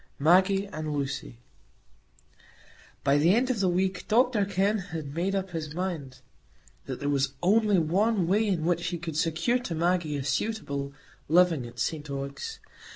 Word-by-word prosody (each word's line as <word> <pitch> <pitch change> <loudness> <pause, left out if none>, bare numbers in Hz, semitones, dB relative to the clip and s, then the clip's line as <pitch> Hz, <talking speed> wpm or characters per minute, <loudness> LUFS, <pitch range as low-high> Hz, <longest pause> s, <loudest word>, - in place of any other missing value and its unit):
Maggie 190 +6 +4
and 155 -6 -5
Lucy 135 - -4 1.7
By 140 +1 +3
the 170 +6 +4
end 255 +2 +2
of 235 - -2
the 190 -2 +2
week 185 +1 -1
Dr 230 -2 +3
Kenn 200 +2 +1
had 165 -7 -6
made 185 +5 -1
up 190 -1 -2
his 160 -2 -5
mind 155 -8 -4 0.7
that - - -5
there 145 - -3
was 140 -1 +1
only 210 +1 +4
one 190 +5 +2
way 210 +4 +2
in 175 -6 0
which 175 0 0
he 175 - -2
could 165 -2 -6
secure 165 +10 +1
to 190 -9 -4
Maggie 170 -2 0
a 135 - -3
suitable 140 -2 -2 0.4
living 165 -6 +3
at 120 - -14
St 150 -2 -2
Ogg's. 140 - -5
175 Hz, 160 wpm, -27 LUFS, 150-195 Hz, 1.7 s, Maggie